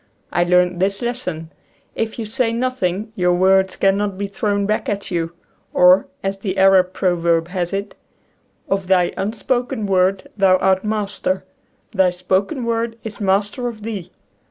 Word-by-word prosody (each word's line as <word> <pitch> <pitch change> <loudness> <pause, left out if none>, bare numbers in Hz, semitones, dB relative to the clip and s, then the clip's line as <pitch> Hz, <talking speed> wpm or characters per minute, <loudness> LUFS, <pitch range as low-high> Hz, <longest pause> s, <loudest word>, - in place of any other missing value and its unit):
I 175 - +2
learned 180 0 +2
this 195 +4 0
lesson: 180 -10 -4 0.4
If 225 -1 -3
you 230 - -3
say 230 +2 0
nothing 225 -4 -1
your 180 -1 +2
words 190 +1 +3
cannot 195 0 +1
bo 200 - -2
thrown 200 0 -1
back 215 +1 -1
at 200 -1 -3
you. 170 -1 -2 0.4
Or, 180 +1 +6 0.2
as 195 0 -2
the 195 -1 -3
Arab 190 -1 +5
proverb 170 -3 +1
has 180 -2 -2
it: 200 +1 -3 0.4
" - - -43
Of 195 -1 -1
thy 180 -2 +3
unspoken 235 +3 -2
word 190 0 +1
thou 190 -2 +4
art 190 0 +2
master; 205 -3 -2 0.5
thy 190 -4 +3
spoken 190 - -1
word 230 0 -1
is 220 -1 -7
master 205 +5 0
of 220 -3 -7
thee." 210 -6 -5
195 Hz, 155 wpm, -20 LUFS, 185-215 Hz, 0.5 s, Or